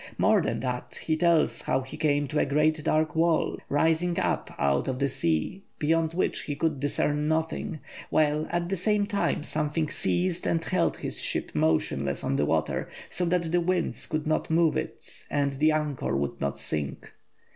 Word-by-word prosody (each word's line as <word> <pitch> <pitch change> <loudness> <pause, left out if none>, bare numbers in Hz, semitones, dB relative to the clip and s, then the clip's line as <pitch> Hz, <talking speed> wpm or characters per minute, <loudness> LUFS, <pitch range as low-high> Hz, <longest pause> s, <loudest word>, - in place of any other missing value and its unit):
More - - +4
than 110 +1 -2
that, 125 -1 -4
he 160 - +1
tells 165 -1 +2
how 130 - 0
he 130 - -8
came 145 -2 +1
to 150 0 0
a - - +3
great 155 +2 +2
dark 155 0 +1
wall 165 0 +2
rising 165 +4 +2
up - - -1
out 70 0 +1
of 130 - -1
the 140 +1 +1
sea, 80 - -1 0.2
beyond 160 +1 +1
which 185 - 0
he 145 - -3
could 155 -1 0
discern 145 +1 0
nothing, 160 -1 -1 0.3
while 155 0 +2
at 175 0 -1
the 195 - -1
same 205 +3 +2
time 200 -6 0
something 155 +1 -1
seized 180 0 -1
and 165 0 +1
held 185 - +1
his - - -3
ship - - 0
motionless 75 -3 +1
on - - 0
the 75 - +2
water, 80 0 0 0.2
so 180 - +1
that 170 -1 0
the 175 0 +3
winds 180 0 -1
could 155 -1 -2
not 155 0 0
move 165 0 +3
it - - -6
and 140 -1 0
the 155 +3 +3
anchor 150 - -1
would 70 0 -3
not 70 0 -1
sink. 70 0 -3
155 Hz, 185 wpm, -27 LUFS, 135-165 Hz, 0.3 s, More